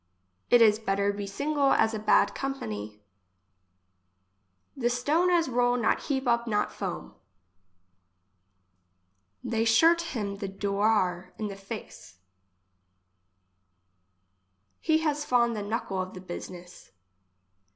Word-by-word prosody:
It 240 Hz, -1 st, +7 dB
is 215 Hz, -1 st, +4 dB
better 200 Hz, -1 st, 0 dB
be 200 Hz, 0 st, -5 dB
single 280 Hz, +6 st, +1 dB
as 220 Hz, -, +2 dB
a 220 Hz, -, -3 dB
bad 215 Hz, -, +3 dB
company. 105 Hz, -, -5 dB, 1.7 s
The 240 Hz, -4 st, 0 dB
stone 295 Hz, +9 st, +1 dB
as 345 Hz, -2 st, +3 dB
roll 245 Hz, 0 st, +2 dB
not 235 Hz, -, 0 dB
heap 270 Hz, -2 st, -2 dB
up 235 Hz, 0 st, +1 dB
not 210 Hz, -2 st, 0 dB
foam. -, -, -5 dB, 2.3 s
They 225 Hz, -1 st, 0 dB
shurt 325 Hz, +10 st, +5 dB
him 200 Hz, -3 st, -3 dB
the 200 Hz, -, -4 dB
doar 195 Hz, -2 st, 0 dB
in 210 Hz, -2 st, -4 dB
face. 195 Hz, -, -10 dB, 2.6 s
He 315 Hz, -1 st, +2 dB
has 295 Hz, -1 st, 0 dB
fond 240 Hz, -4 st, +2 dB
the 210 Hz, -, -3 dB
knuckle 205 Hz, -2 st, -3 dB
of 185 Hz, 0 st, -7 dB
the 185 Hz, -, -8 dB
business. 175 Hz, 0 st, -9 dB
220 Hz, 110 wpm, -27 LUFS, 195-250 Hz, 2.6 s, It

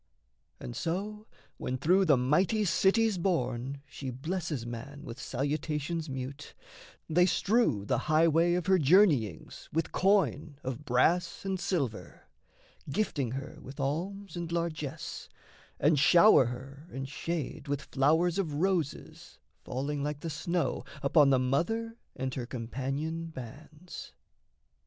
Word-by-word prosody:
And -, -, -7 dB
so, 210 Hz, +6 st, -3 dB, 0.3 s
when 130 Hz, -, -3 dB
through 185 Hz, +8 st, +3 dB
the 145 Hz, -6 st, +5 dB
mighty 175 Hz, -, +2 dB
cities 195 Hz, +3 st, +3 dB
borne, 140 Hz, -6 st, -1 dB
She 135 Hz, 0 st, -6 dB
blesses 150 Hz, 0 st, -3 dB
man 120 Hz, +5 st, -7 dB
with 115 Hz, -, -8 dB
salutations 150 Hz, +4 st, -2 dB
mute, 135 Hz, +2 st, -6 dB, 0.5 s
They 175 Hz, +3 st, +4 dB
strew 200 Hz, -, +2 dB
the -, -, +1 dB
highway 165 Hz, +2 st, +4 dB
of 180 Hz, -2 st, -1 dB
her 190 Hz, -1 st, +4 dB
journeyings 145 Hz, -, +3 dB
With 165 Hz, +1 st, -1 dB
coin 180 Hz, -7 st, +2 dB
of 130 Hz, +3 st, -5 dB
brass 170 Hz, +10 st, +2 dB
and 190 Hz, -1 st, -1 dB
silver, 140 Hz, -, -3 dB, 0.7 s
gifting 140 Hz, -, -1 dB
her 135 Hz, +2 st, -6 dB
With 135 Hz, +2 st, -11 dB
alms 180 Hz, +9 st, -3 dB
and 170 Hz, -1 st, -4 dB
largesse, 165 Hz, -4 st, -4 dB, 0.5 s
and 150 Hz, 0 st, +4 dB
shower 170 Hz, 0 st, +7 dB
her 135 Hz, +5 st, -7 dB
and 135 Hz, 0 st, -5 dB
shade 150 Hz, +2 st, -4 dB
With 145 Hz, +1 st, -2 dB
flowers 160 Hz, +6 st, +2 dB
of 160 Hz, -7 st, -1 dB
roses 170 Hz, -3 st, -2 dB, 0.3 s
falling 140 Hz, +3 st, -3 dB
like 145 Hz, 0 st, -3 dB
the 165 Hz, -, -4 dB
snow 170 Hz, +3 st, -1 dB, 0.2 s
Upon 140 Hz, 0 st, +5 dB
the 135 Hz, -, +5 dB
Mother 175 Hz, -, 0 dB, 0.2 s
and 130 Hz, 0 st, -3 dB
her 125 Hz, -3 st, -4 dB
companion 135 Hz, +7 st, -3 dB
bands. 155 Hz, +5 st, -10 dB
150 Hz, 130 wpm, -30 LUFS, 135-175 Hz, 0.7 s, shower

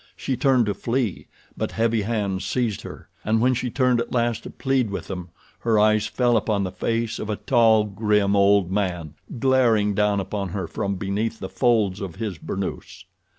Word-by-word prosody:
She 135 Hz, -, -2 dB
turned 130 Hz, -3 st, +3 dB
to 105 Hz, -, 0 dB
flee, 115 Hz, 0 st, -2 dB, 0.3 s
but -, -, -3 dB
heavy 115 Hz, -1 st, +1 dB
hands 100 Hz, -3 st, -2 dB
seized 120 Hz, -5 st, -1 dB
her, -, -, -10 dB, 0.2 s
and 110 Hz, +1 st, +1 dB
when 125 Hz, +3 st, +3 dB
she 125 Hz, 0 st, -2 dB
turned 125 Hz, -1 st, +2 dB
at -, -, -6 dB
last 120 Hz, -2 st, 0 dB
to -, -, -9 dB
plead 135 Hz, -4 st, 0 dB
with 100 Hz, -, -5 dB
them 90 Hz, -3 st, -6 dB, 0.3 s
her 115 Hz, -2 st, +1 dB
eyes 105 Hz, 0 st, +3 dB
fell 120 Hz, -2 st, +2 dB
upon 105 Hz, -2 st, 0 dB
the 95 Hz, -, -3 dB
face 115 Hz, +2 st, -2 dB
of 110 Hz, -, -5 dB
a 105 Hz, -, 0 dB
tall, 115 Hz, -2 st, +4 dB
grim, 105 Hz, -1 st, +1 dB
old 100 Hz, -2 st, +4 dB
man 90 Hz, -6 st, -2 dB, 0.2 s
glaring 115 Hz, -5 st, +3 dB
down 105 Hz, 0 st, +2 dB
upon 100 Hz, 0 st, -3 dB
her 95 Hz, 0 st, -3 dB
from 100 Hz, +3 st, -3 dB
beneath 100 Hz, +4 st, -2 dB
the 95 Hz, -3 st, -6 dB
folds 110 Hz, -6 st, +1 dB
of 95 Hz, -4 st, -5 dB
his 105 Hz, -7 st, -4 dB
burnous. 95 Hz, -1 st, -5 dB
105 Hz, 190 wpm, -23 LUFS, 100-115 Hz, 0.3 s, tall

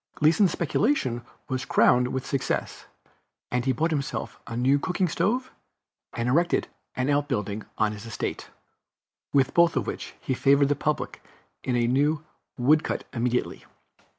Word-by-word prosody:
Gleason's 160 Hz, +5 st, +4 dB
speculation 165 Hz, -, 0 dB, 0.3 s
was 130 Hz, -1 st, -2 dB
crowned 125 Hz, 0 st, +4 dB
with 130 Hz, +1 st, -3 dB
success, 135 Hz, -1 st, -2 dB, 0.6 s
and 125 Hz, 0 st, 0 dB
he 135 Hz, -, +3 dB
bought 160 Hz, +7 st, 0 dB
himself 140 Hz, -3 st, -3 dB
a 115 Hz, 0 st, -5 dB
new 135 Hz, +3 st, +3 dB
cooking 180 Hz, +4 st, 0 dB
stove, 250 Hz, +10 st, 0 dB, 0.6 s
and 115 Hz, 0 st, -2 dB
erected 170 Hz, +8 st, +2 dB, 0.3 s
an 130 Hz, +1 st, 0 dB
outbuilding 130 Hz, -8 st, -1 dB
on 110 Hz, -1 st, +2 dB
his 105 Hz, +1 st, -8 dB
estate, 115 Hz, -, -4 dB, 0.8 s
with 135 Hz, -1 st, +3 dB
both 170 Hz, -1 st, +4 dB
of -, -, 0 dB
which -, -, -6 dB
he 130 Hz, -, -2 dB
favored 140 Hz, +2 st, +4 dB
the 145 Hz, -, +2 dB
public 150 Hz, +2 st, -2 dB, 0.4 s
in 125 Hz, -, 0 dB
a 120 Hz, -1 st, +2 dB
new 145 Hz, +5 st, +1 dB, 0.3 s
wood 150 Hz, +5 st, +4 dB
cut -, -, -2 dB
immediately. 125 Hz, 0 st, -1 dB
135 Hz, 150 wpm, -26 LUFS, 125-155 Hz, 0.8 s, Gleason's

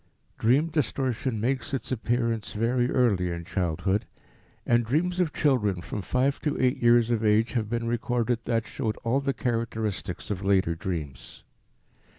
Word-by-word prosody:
Dream 135 Hz, +8 st, +3 dB
distortion 130 Hz, -5 st, -1 dB
makes 130 Hz, +4 st, -1 dB
its 130 Hz, -, -5 dB
appearance 115 Hz, -2 st, -1 dB
very 120 Hz, +3 st, +1 dB
early 100 Hz, -10 st, +2 dB
in 85 Hz, 0 st, -5 dB
childhood, 95 Hz, +3 st, -1 dB, 0.6 s
and 120 Hz, 0 st, +3 dB
dreams 170 Hz, +10 st, 0 dB
of 175 Hz, -4 st, +2 dB
children 110 Hz, -13 st, +1 dB
from 100 Hz, +4 st, -5 dB
five 130 Hz, +7 st, 0 dB
to 150 Hz, -, -1 dB
eight 125 Hz, -1 st, +1 dB
years 120 Hz, 0 st, +5 dB
of 115 Hz, -1 st, 0 dB
age 110 Hz, +2 st, +3 dB
have 110 Hz, -4 st, -1 dB
been 120 Hz, 0 st, -1 dB
recorded 120 Hz, 0 st, 0 dB
that 115 Hz, -2 st, 0 dB
showed 110 Hz, -1 st, -3 dB
all 120 Hz, +4 st, +2 dB
the 140 Hz, 0 st, 0 dB
characteristics 110 Hz, -7 st, -3 dB
of 100 Hz, -1 st, -3 dB
later 95 Hz, -4 st, +2 dB
dreams. 80 Hz, -7 st, -6 dB
115 Hz, 155 wpm, -27 LUFS, 105-125 Hz, 0.6 s, years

